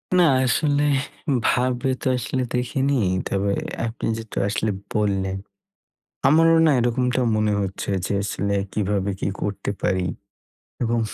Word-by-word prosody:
না 180 Hz, -, +6 dB, 0.2 s
আসলে 145 Hz, +3 st, +2 dB, 0.6 s
ভাবে 125 Hz, +1 st, +1 dB
তো -, -, -2 dB
আসলে 130 Hz, +2 st, -2 dB
দেখিনি। 135 Hz, +3 st, 0 dB, 0.3 s
তবে 100 Hz, 0 st, 0 dB, 0.3 s
আপনি 115 Hz, +1 st, -4 dB
যেহেতু 115 Hz, -1 st, -8 dB
আসলে 110 Hz, +1 st, 0 dB, 0.2 s
বললেন, 95 Hz, -2 st, 0 dB, 0.9 s
আমারও 165 Hz, +3 st, +5 dB
না -, -, +5 dB
এরকমটা 125 Hz, +1 st, +1 dB, 0.2 s
মনে 105 Hz, -1 st, +2 dB
হচ্ছে 95 Hz, 0 st, -3 dB, 0.2 s
যে -, -, -2 dB
আসলে 100 Hz, 0 st, -1 dB, 0.2 s
কীভাবে 100 Hz, -1 st, 0 dB
কী -, -, 0 dB
করতে 100 Hz, -1 st, -2 dB
পারি? 95 Hz, -1 st, +1 dB, 0.8 s
এবং 120 Hz, 0 st, +1 dB
115 Hz, 125 wpm, -23 LUFS, 100-130 Hz, 0.9 s, না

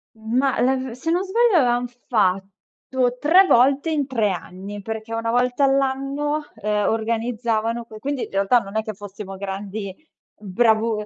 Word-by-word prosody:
Ma 245 Hz, +5 st, 0 dB
la 260 Hz, +2 st, +3 dB
v 260 Hz, -2 st, -4 dB
se 260 Hz, +7 st, -3 dB
non 355 Hz, +2 st, +2 dB
sbaglio 440 Hz, 0 st, +3 dB
avevam 245 Hz, -3 st, +2 dB, 0.2 s
fatto 210 Hz, +5 st, -1 dB
3 350 Hz, +7 st, +6 dB
volte 275 Hz, +2 st, +3 dB
in 290 Hz, -3 st, 0 dB
3 225 Hz, -6 st, +1 dB
anni, 190 Hz, +3 st, -7 dB
perché 220 Hz, +2 st, -6 dB
una 230 Hz, 0 st, -2 dB
volta 245 Hz, +3 st, +2 dB
all'anno 275 Hz, +2 st, 0 dB
eh 210 Hz, -1 st, -1 dB
organizzavano 230 Hz, 0 st, -1 dB
que 215 Hz, -1 st, -12 dB
quindi 275 Hz, +2 st, -3 dB
in -, -, -8 dB
realtà 195 Hz, +5 st, +3 dB
non 200 Hz, -1 st, -6 dB
è 220 Hz, -, 0 dB
che 215 Hz, -1 st, -5 dB
fossimo 200 Hz, 0 st, -9 dB
grandi 195 Hz, +1 st, -5 dB, 0.5 s
bravu 220 Hz, +1 st, +1 dB
230 Hz, 155 wpm, -22 LUFS, 210-265 Hz, 0.5 s, 3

